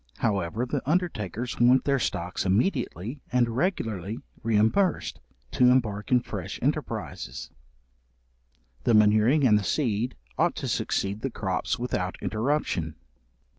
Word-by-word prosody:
However, 100 +2 0
the 135 +2 -2
undertakers 125 - -1
want 125 +2 +5
their 140 -1 +2
stocks 90 -5 -2
immediately 120 - 0
and 120 -2 +2
regularly 115 - -1 0.2
reimbursed, 110 - +1 0.3
to 125 -1 +5
embark 110 -5 +1
in 125 -1 +5
fresh - - -6
enterprises: - - -3 1.3
the 115 - +4
manuring 110 +7 +5
and 105 -4 +5
the - - -4
seed 120 -1 0 0.2
ought - - +3
to - - -4
succeed 100 +2 -1
the 135 - -1
crops 95 +3 -2
without 110 -7 -2
interruption. 110 - -1
115 Hz, 120 wpm, -27 LUFS, 100-130 Hz, 1.3 s, want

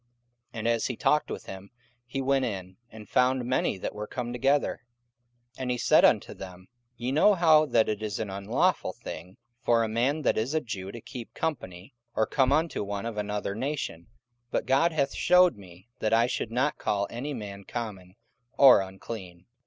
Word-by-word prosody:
44:010:027 120 - -44 0.5
And 110 - -2
as 115 -1 +1
he 125 - -3
talked 150 0 +2
with - - -6
him, 95 +1 -9 0.4
he 135 +2 -3
went 135 0 +2
in, 95 -6 -5
and 110 -2 -12
found 125 +2 +2
many 125 -5 0
that - - -4
were 105 0 -6
come 120 -1 -4
together. 135 +3 +1 0.8
44:010:028 - - -8
And 130 - -2
he 125 - 0
said - - +4
unto - - +3
them, 95 -1 -10 0.3
Ye 120 +2 -2
know 195 +9 +5
how 160 -3 +5
that 115 -5 +3
it 105 0 -2
is 105 -3 -3
an 105 -3 -3
unlawful 100 0 0
thing 90 +2 -9 0.3
for 115 -1 +3
a - - 0
man 130 +8 0
that - - +2
is 125 +8 -2
a - - +4
Jew 100 -8 -6
to 115 - -9
keep 120 -1 -9
company, 95 - -4 0.2
or 110 - +2
come 130 +3 +2
unto 155 -4 +1
one 100 +1 -4
of 115 -2 -5
another 105 -1 -2
nation; 115 - -4 0.4
but - - -1
God 140 +6 +3
hath 140 -3 0
shewed 180 0 +5
me 95 0 -15
that 110 - 0
I 115 +1 +5
should 120 - -2
not 130 +5 0
call 100 -1 0
any 135 +5 -4
man 100 -3 -7
common 100 -6 -6 0.4
or 130 -7 +8
unclean. 95 -2 -8
115 Hz, 195 wpm, -27 LUFS, 100-135 Hz, 0.8 s, or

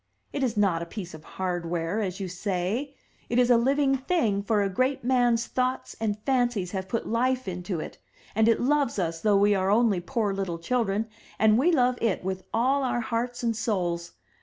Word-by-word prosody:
It 280 - -2
is 240 -4 0
not 190 -5 +2
a 170 - -5
piece 185 -2 -7
of 155 -1 -11
hardware, 175 +1 -2
as 190 -2 -3
you 195 - -3
say; 195 +9 -2 0.3
it 235 - 0
is 250 0 +4
a - - +7
living 270 +3 +2
thing, 260 - 0
for 205 0 +1
a - - +1
great 255 +8 0
man's 245 -2 +2
thoughts 255 0 -2
and 215 -2 -1
fancies 245 -9 +1
have 190 -1 -4
put 230 - -2
life 255 +2 0
into 180 -1 -3
it, - - -7 0.3
and 220 +1 +3
it 230 - +4
loves 280 -2 +1
us 165 -3 -2
though 210 -2 +4
we 205 +1 +4
are 190 -1 +1
only 215 -2 +3
poor 215 0 -1
little 190 -3 -3
children, 215 +2 0 0.3
and 220 +1 +4
we 335 +7 +4
love 250 -5 +2
it 220 -6 0
with 190 0 -3
all 260 +5 +2
our 250 -2 0
hearts 240 +2 -3
and 230 -1 +1
souls! 175 -6 -2
220 Hz, 200 wpm, -26 LUFS, 190-250 Hz, 0.3 s, a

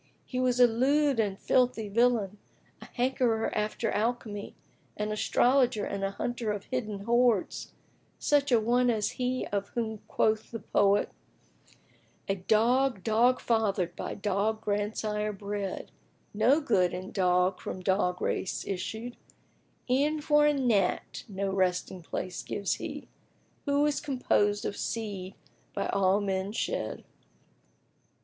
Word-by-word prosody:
He 255 - -4
was 250 -1 +1
a 245 - +9
lewd 270 +3 +2
and 200 -3 0
filthy 250 -1 +1
villain, 215 -2 +1 0.4
a - - -9
hankerer 245 -3 0
after 215 +1 -1
alchemy, 215 -2 -2 0.4
an 210 0 -2
astrologer 245 +1 +2
and 200 -1 -4
a 195 - +1
hunter 230 +2 -3
of 205 -1 -4
hidden 215 -6 -4
hoards, 235 -2 +1 0.4
such 285 -2 +2
an 225 -3 +3
one 245 +1 +3
as 215 -3 0
he 255 0 -2
of 200 -1 -2
whom 220 -2 -2
quoth 215 0 +1
the 230 - -5
poet, 200 -1 +2 1.2
"A 195 - +1
dog, 225 +3 +2
dog 235 +4 +3
fathered, 200 -6 0
by - - -5
dog 210 +2 -1
grandsire 210 0 -1
bred; 200 -1 -5 0.2
* - - -38
No 280 +5 +5
good 185 - +2
in 185 +1 -6
dog 180 -1 +2
from 185 - -6
dog 180 -1 0
race 185 - -2
issued: 220 +6 -4 0.7
E'en 285 +5 +2
for 295 0 +4
a 295 - +4
gnat 225 -9 0
no 195 0 -2
resting 185 -1 0
place 180 +1 -5
gives 200 -1 -2
he - - -6 0.3
* - - -38
Who 285 0 +2
is 295 -1 0
composed 210 -7 +1
of - - -2
seed 200 -5 -4 0.4
by - - -1
all 195 0 +3
men 195 0 -2
shed." - - -3
215 Hz, 140 wpm, -29 LUFS, 195-245 Hz, 1.2 s, a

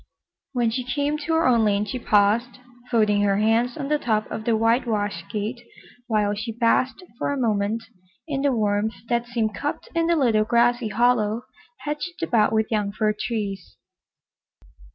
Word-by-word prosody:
When 240 -3 +1
she 255 +2 -2
came 285 +4 -1
to 320 +2 -2
her 325 - +2
own 235 -3 +4
lane 205 -1 +2
she 230 +5 -4
paused, 220 +3 +2 0.3
folding 215 -4 +3
her 200 -1 +2
hands 225 +4 +2
on 280 -3 -3
the 300 +1 +1
top 215 -4 0
of 220 - -5
the 230 -2 +2
whitewashed 220 -6 0
gate, 220 +3 -3 0.5
while 210 -3 +1
she 215 +3 -4
basked 240 +7 +1 0.2
for - - -1
a 285 - -2
moment 220 -1 0 0.4
in 275 -3 -2
the 280 0 +2
warmth 215 -1 0
that 235 0 0
seemed 230 -3 -1
cupped 290 - -4
in 330 0 +1
the 340 - +3
little 235 -8 +3
grassy 240 +1 +2
hollow 230 0 +1 0.4
hedged 300 +4 -4
about 230 -9 +3
with 220 0 0
young 210 -2 0
fir 215 +1 0
trees. 205 -4 -4
230 Hz, 170 wpm, -24 LUFS, 210-250 Hz, 0.5 s, own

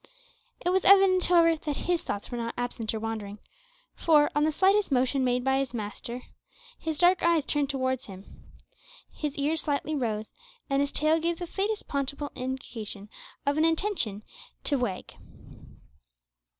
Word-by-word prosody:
It 355 - +3
was 375 0 +2
evident, 385 -2 +6
however, 335 -2 +5
that 300 -2 -4
his 350 -1 0
thoughts 205 -9 -5
were 240 - -3
not 230 0 -4
absent 240 -2 -3
or 220 - -3
wandering, 215 -2 -5 0.6
for, 300 -3 +4
on 295 - +3
the 315 - +2
slightest 390 +3 +3
motion 260 +1 +2
made 250 0 +1
by 265 +1 +2
his 265 -3 -3
master, 235 +3 -5 0.6
his 320 -2 -3
dark 360 +2 +4
eyes 335 -4 +3
turned 290 -2 +1
towards 260 -2 -1
him, 195 -1 -13 0.6
his 300 -1 -4
ears 300 +3 +1
slightly 295 +1 -1
rose, 220 -6 -2 0.4
and 275 0 +3
his 285 0 0
tail 310 +2 +2
gave 335 +1 -1
the 350 - -5
faintest 410 +5 -2
possible 280 +1 -2
indication 225 -5 -6 0.4
of 285 +1 +1
an - - +4
intention 325 - 0 0.4
to 285 -3 +1
wag. 210 -7 -3
280 Hz, 160 wpm, -28 LUFS, 245-330 Hz, 0.6 s, evident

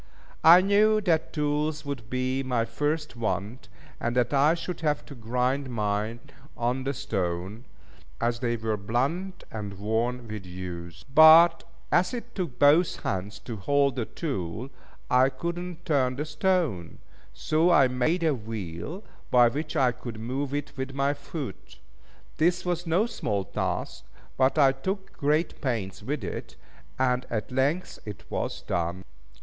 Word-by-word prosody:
I 170 +3 +9
knew 210 +2 +4
that 165 -5 +1
tools 150 0 -1
would 130 -6 -5
be 130 +1 -1
my 125 -3 0
first 150 +5 -2
want, 110 -1 -3 0.3
and 120 +1 -1
that 125 +2 +2
I 145 +4 +4
should 175 0 -5
have 150 -2 0
to 145 - -10
grind 125 +3 -1
mine 105 0 -1 0.4
on 125 +2 -1
the 140 - 0
stone, 95 +2 -3 0.5
as 115 0 0
they 120 -2 0
were 110 -1 -1
blunt 140 - -2
and 100 -3 -6
worn 115 +4 -1
with 105 -2 -6
use. 90 -2 -7
But 165 +2 +8 0.3
as 180 +8 +3
it 240 0 -7
took 170 -10 -4
both 150 +6 +4
hands 100 +3 -3
to 115 -3 -6
hold 140 +5 +2
the 120 -4 -1
tool, 120 - -4 0.4
I 130 +1 +4
could 170 +5 -4
not 175 -1 -8
turn 130 -6 +2
the 150 +3 -3
stone; 155 - 0 0.3
so 160 +3 +1
I 145 -7 +6
made 130 +8 0
a 160 -2 +3
wheel 110 - -6 0.3
by 120 -1 +6
which 150 +5 -4
I 130 -2 +4
could 115 -2 -8
move 130 +5 -3
it 145 0 -4
with 135 0 -5
my 140 +1 +2
foot. 140 - -7 0.6
This 175 +3 +2
was 175 -1 -2
no 175 +7 +3
small 105 - -2
task, - - -3 0.3
but 130 +3 +2
I 140 -3 +6
took 190 +9 -4
great 155 +3 0
pains 110 - -2
with 140 -3 -3
it, 90 - -6 0.4
and 125 -1 +1
at 110 +1 -3
length 140 +8 0
it 105 -3 -8
was - - -3
done. 85 +2 -2
130 Hz, 155 wpm, -27 LUFS, 115-155 Hz, 0.6 s, I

